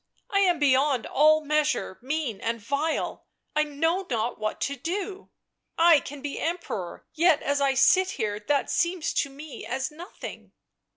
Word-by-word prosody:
"I 395 - +3
am 365 -3 +4
beyond 275 -3 +3
all 310 +2 +4
measure 300 -9 0
mean 265 -5 -3
and 230 0 -2
vile.... 280 +8 -2 0.3
I 305 - +4
know 325 +5 0
not 235 -2 -1
what 215 0 -2
to 280 - -1
do.... 375 - -4 0.5
I 330 -2 +7
can 280 0 -9
be 290 -1 -4
Emperor, 325 - -4
yet 330 -1 +3
as 285 0 0
I 275 -1 +2
sit 370 +8 +5
here 210 -4 -2
that 280 +6 0
seems 345 -1 0
to 280 - 0
me 285 +2 -9
as 265 +4 -3
nothing." 335 +5 -10
290 Hz, 160 wpm, -26 LUFS, 265-325 Hz, 0.5 s, I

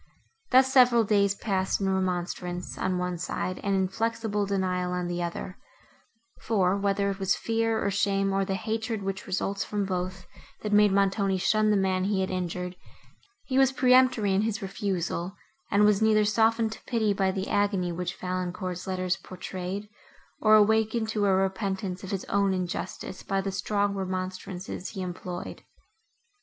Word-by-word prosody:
Thus 265 +1 +5
several 245 -3 +6
days 200 -1 +2
passed, 190 -3 -1
in 195 - 0
remonstrance, 180 -1 -2
on 185 -1 -1
one 180 -1 -2
side, 185 +1 -3
and 200 -1 +1
inflexible 210 +2 -1
denial, 185 -2 -1
on 180 0 -2
the 175 0 -2
other; 175 +2 -5 0.8
for, 195 -4 +1
whether 200 0 +1
it 195 - -6
was 190 -1 +2
fear, 225 -1 0
or 200 - 0
shame, 195 0 +1
or 195 0 +2
the 195 0 -2
hatred, 220 0 -3
which 195 0 -4
results 195 +1 -1
from 205 0 -2
both, 185 0 -3 0.4
that 210 -1 -2
made 210 -1 +6
Montoni 195 0 +2
shun 215 +3 +2
the 210 - +4
man 190 -1 +1
he 200 -1 +1
had 190 - -2
injured, 180 0 -3 0.7
he 265 0 +1
was 270 -1 +5
peremptory 255 -6 +4
in 195 - +3
his 215 -2 -2
refusal, 190 -2 -3 0.3
and 205 +1 +4
was 210 0 +3
neither 215 -1 +4
softened 225 +1 +2
to - - -9
pity 220 -5 +1
by 195 -1 +1
the 190 +1 -2
agony, 200 -3 +1
which 180 +1 -3
Valancourt's 180 0 -4
letters 185 -1 -1
portrayed, 185 +2 -6 0.5
nor 215 0 +6
awakened 220 +1 +3
to 210 -2 +1
a 195 - +4
repentance 190 -1 -1
of 190 - -6
his 195 -2 -3
own 200 -1 +1
injustice 185 +1 -4
by 195 - -1
the 195 0 -2
strong 200 +1 0
remonstrances 185 -1 -4
he 195 -3 -5
employed. 180 0 -6
195 Hz, 165 wpm, -27 LUFS, 185-210 Hz, 0.8 s, several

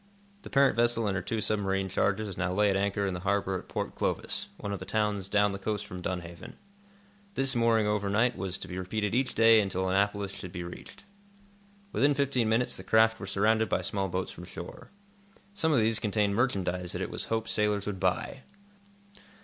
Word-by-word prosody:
The - - -10
parent 140 -1 +4
vessel 120 -1 +2
and 100 -2 0
her 95 - -1
two 110 +4 -3
submarine 95 -2 0
charges 100 +1 0
now 90 0 -1
lay 105 +2 +3
at - - 0
anchor 100 +1 0
in 95 - -1
the 90 - -4
harbor 95 0 0
at - - -14
Port - - -3
Clovis, - - -2
one 100 - -4
of 100 - -4
the - - -6
towns 105 -3 -1
down 105 0 +3
the 100 - -5
coast 105 0 -2
from 90 -3 -8
Dunhaven. 85 -2 -6 0.8
This 135 -1 +3
mooring 115 -2 +3
overnight 105 +3 +1
was 95 0 -2
to - - -8
be 90 0 -5
repeated 105 +3 -2
each 130 +2 0
day 115 -1 +7
until 95 -2 -1
Annapolis 100 +1 +1
should 95 -2 -8
be 90 -1 -5
reached. 85 - -10 0.9
Within 145 +1 +3
fifteen 130 -5 +1
minutes 115 +3 +1
the - - -8
craft 110 0 +4
were 100 - -6
surrounded 110 +2 +2
by 90 - 0
small 95 0 -1
boats 90 +1 -3
from 90 - -10
shore. 85 -1 -9 0.6
Some 160 -5 +1
of 145 - +4
these 110 -1 +3
contained 105 -1 +1
merchandise 95 -6 0
that - - -4
it - - -5
was - - -1
hoped 110 0 -2
sailors 105 -2 0
would 100 -2 -4
buy. 95 +8 -1
100 Hz, 200 wpm, -29 LUFS, 95-110 Hz, 0.9 s, day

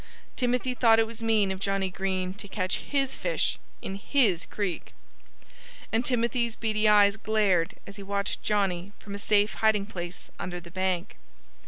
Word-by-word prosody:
Timothy 250 0 0
thought 230 -2 +5
it 225 - +4
was 230 0 -9
mean 220 -3 +2
of 190 - -4
Johnnie 195 -1 -1
Green 185 -1 -2
to 205 +1 -9
catch 185 -1 -1
his 275 -2 -1
fish, - - -1 0.2
in 190 - -4 0.2
his 215 - +3
creek. 195 -5 -3 1.0
And 225 +2 +2
Timothy's 235 -2 0
beady 215 -1 +1
eyes 205 -1 +6
glared 210 -6 +1
as 200 - -10
he - - -8
watched 200 0 -2
Johnnie 195 -2 0
from 200 - -9
a 200 - -5
safe 205 0 +2
hiding 215 -2 +3
place 175 -3 -7
under 180 -1 -4
the 170 0 -13
bank. 185 -1 -1
205 Hz, 165 wpm, -27 LUFS, 190-225 Hz, 1.0 s, eyes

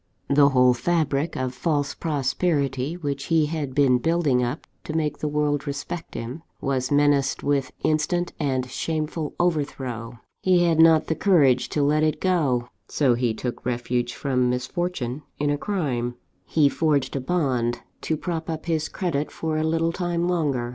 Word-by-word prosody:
The 140 0 +6
whole 125 -2 +5
fabric 150 +2 0
of 130 -1 -2
false 145 +1 -1
prosperity 140 -1 -1
which 140 -4 -3
he 160 -1 +3
had 150 -4 -4
been 135 -3 +4
building 160 -5 +2
up 125 +5 -3 0.2
to 155 - -4
make 150 -2 -1
the 150 - -2
world 150 -1 0
respect 145 +4 -5
him, 125 +7 -5 0.2
was 130 -2 -1
menaced 145 -1 +2
with 140 -2 0
instant 175 +3 0
and 130 -4 0
shameful 155 +2 -3
overthrow. 130 -8 -2 0.2
He 180 -2 +4
had 165 -2 +2
not 160 -1 +6
the - - 0
courage 145 -9 +3
to 150 - 0
let 150 +2 +3
it 155 0 +1
go; 140 -10 +1 0.2
so 135 -5 +2
he 120 -2 0
took 125 +2 -5
refuge 120 0 -1
from 125 -3 +1
misfortune 130 +1 -2 0.2
in 145 0 0
a - - +2
crime. 130 - -2 0.3
"He 155 -3 +4
forged 145 -2 +1
a 135 - -1
bond, 130 -6 0 0.2
to 160 - -1
prop 165 0 -4
up 160 -1 -4
his 160 -2 -1
credit 155 -6 -2
for 160 -1 -3
a 155 - 0
little 165 +1 +1
time 175 -1 -1
longer. 145 -9 0
145 Hz, 165 wpm, -24 LUFS, 130-160 Hz, 0.3 s, The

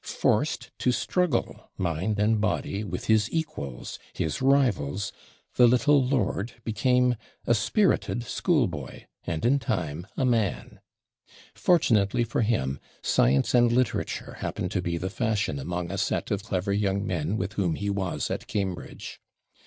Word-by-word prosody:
Forced - - 0
to 125 - +2
struggle, 140 +3 -1
mind 95 +4 -1
and 105 +1 +2
body, 105 -1 -1
with 105 - -5
his 110 -1 +3
equals, 70 - -4
his 80 - -2
rivals, 105 - +2 0.4
the 125 - +8
little 135 +4 +4
lord 125 -3 0
became 125 +2 +2 0.3
a - - +4
spirited 120 - +1
schoolboy, 110 - -1 0.2
and, 85 -2 -2
in 135 +4 +4
time, 90 - -3
a 130 - +2
man. 115 -6 0 0.7
Fortunately 120 - +3
for 120 +1 -1
him, 70 - 0 0.2
science 65 +2 +3
and 120 -1 +5
literature 125 -2 -1
happened - - -3
to - - 0
be 85 -1 -2
the 95 +3 -3
fashion 105 - -1
among 85 +4 -3
a 95 - -3
set 100 - -1
of 100 -1 0
clever 100 -1 -1
young 100 -1 0
men 85 +3 -1
with 95 +1 -3
whom 90 -6 0
he 100 0 -2
was 95 -3 -2
at - - -4
Cambridge. 95 -4 -4
105 Hz, 145 wpm, -27 LUFS, 90-120 Hz, 0.7 s, the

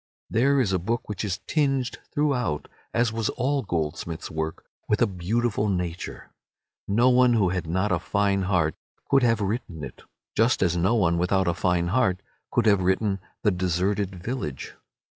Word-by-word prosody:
There 135 +5 +3
is 105 -7 +1
a 95 - +2
book 115 +7 -2
which 105 - -4
is 95 -3 -2
tinged 135 -4 0
throughout, 125 - 0 0.2
as 115 -1 +1
was 115 -1 -1
all 140 +3 0
Goldsmith's 80 -4 -3
work, 80 0 -4 0.2
with 105 - +2
a 120 - +5
beautiful 105 +3 -1
nature. 90 -2 -4 0.6
No 120 +6 +4
one 125 -1 +5
who 105 -5 +3
had 90 -2 -2
not 95 +5 0
a 90 - +2
fine 100 +2 +1
heart 85 -5 +2 0.4
could 135 - +5
have 115 -3 +2
written 95 - -3
it, 65 - -8 0.3
just 115 -2 +3
as 85 -2 +2
no 95 +7 +2
one 85 -6 +2
without 95 +1 +2
a 85 - +2
fine 85 -1 +1
heart 100 -4 +1 0.3
could 120 - +1
have 100 -3 +4
written 95 +2 +1 0.2
"The 105 - +4
Deserted 95 +2 0
Village." 90 - -5
100 Hz, 170 wpm, -25 LUFS, 90-120 Hz, 0.6 s, a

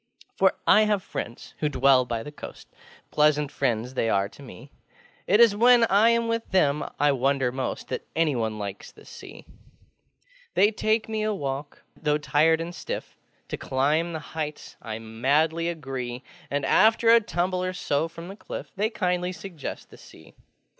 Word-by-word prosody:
For - - +3
I 215 0 +6
have 205 -3 0
friends 115 - -7
who 150 - 0
dwell 135 -2 +4
by 115 -2 -3
the 150 - -8
coastŌĆö 145 - -10 0.5
Pleasant 150 -1 +2
friends 125 -2 -1
they 115 -3 0
are 100 -1 +1
to 145 - -16
me! 135 0 -12 0.6
It 205 +4 +4
is 230 -3 +6
when 240 +2 +6
I 210 +4 +5
am 235 0 +2
with 230 0 -2
them 150 -6 +2 0.2
I 145 0 +4
wonder 135 -1 +1
most 130 0 -4
That - - -5
anyone 120 -10 0
likes 100 -1 -7
the - - -18
Sea. - - -12 1.1
They 205 +2 +5
take 215 +1 0
me 220 -1 -2
a 215 0 0
walk: 140 -2 -5
though 150 -2 0
tired 155 +2 +2
and 170 +1 -5
stiff, - - -6 0.3
To - - -4
climb 150 +6 0
the 160 - -3
heights 155 -2 -5
I 110 -2 -5
madly 145 +9 0
agree; 130 -6 -5 0.3
And, 140 -1 -1
after 225 +6 +4
a 230 0 +7
tumble 180 -2 -1
or 185 - -1
so 160 -3 -1
from 165 +1 -10
the 195 - -8
cliff, - - -8
They 210 +2 0
kindly 180 -4 -1
suggest 180 -5 -8
the - - -14
Sea. - - -16
150 Hz, 175 wpm, -25 LUFS, 135-190 Hz, 1.1 s, a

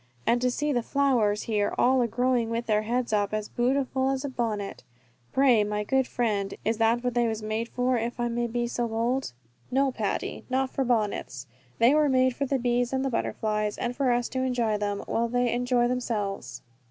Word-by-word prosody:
And 240 +1 +2
to 250 - +2
see 295 +4 -1
the 240 - +1
flowers 235 -6 +1
here 210 -2 0
all 260 +1 +4
a 240 - +2
growing 245 0 +1
with 230 +1 -2
their 210 -1 +2
heads 235 +1 -1
up 205 0 +1
as 215 -1 -3
bootiful 260 +1 0
as 270 +1 -2
a - - -2
bonnet. 220 - -3 0.5
Pray, 255 -5 +4
my 210 0 -2
good 265 +4 +1
friend, 205 -5 -1
is 220 +1 0
that 230 +2 +2
what 250 -1 0
they 240 -1 +2
was 220 -1 -3
made 220 +2 -2
for, 250 0 +1
if 235 +2 -4
I 240 - +1
may 235 0 -1
be 240 +1 -1
so 240 0 -2
bold?" 230 - -1 0.4
"No, 270 +1 +2
Patty, 215 -5 -3
not 260 0 0
for 270 - 0
bonnets. 210 - -1 0.3
They 235 +4 +5
were 300 -1 +3
made 255 -1 +3
for 280 - -1
the 275 - +1
bees 245 0 0
and 265 0 0
the 270 - -1
butterflies, 210 -2 -1
and 240 0 -2
for 270 -2 +1
us 240 0 +1
to 260 - -2
enjoy 240 -5 0
them, 205 -1 -2
while 235 +1 0
they 245 0 +1
enjoy 245 0 +2
themselves." 225 -5 -3
240 Hz, 210 wpm, -27 LUFS, 220-255 Hz, 0.5 s, They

